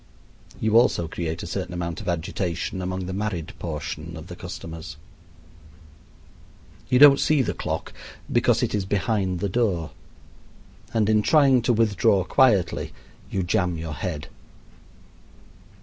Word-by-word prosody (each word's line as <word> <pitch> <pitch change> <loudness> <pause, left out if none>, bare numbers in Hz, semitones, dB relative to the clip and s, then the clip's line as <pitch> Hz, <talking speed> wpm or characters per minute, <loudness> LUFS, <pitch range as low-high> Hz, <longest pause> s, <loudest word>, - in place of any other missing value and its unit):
You 110 +1 +4
also 85 -8 +2
create 80 0 -4
a - - -5
certain 90 +1 -4
amount 85 -1 -4
of - - -4
agitation 85 +1 -2
among 95 0 -3
the 95 - -5
married 95 -5 -3
portion 80 0 -5
of 80 - -9
the 90 - -7
customers. 80 -2 -8 1.9
You 125 - +4
don't 140 0 +8
see 150 -3 +3
the - - -2
clock - - -4 0.4
because - - +3
it - - -1
is 105 -2 0
behind 95 -2 -1
the 100 - 0
door; 95 -7 0 1.0
and 110 -2 +1
in 110 -1 +4
trying 135 0 +4
to 120 +1 +2
withdraw 105 -3 +3
quietly 105 -5 +2 0.4
you 95 - -1
jam 90 -1 0
your 80 -1 -5
head. 75 -4 -4
95 Hz, 135 wpm, -24 LUFS, 85-105 Hz, 1.9 s, don't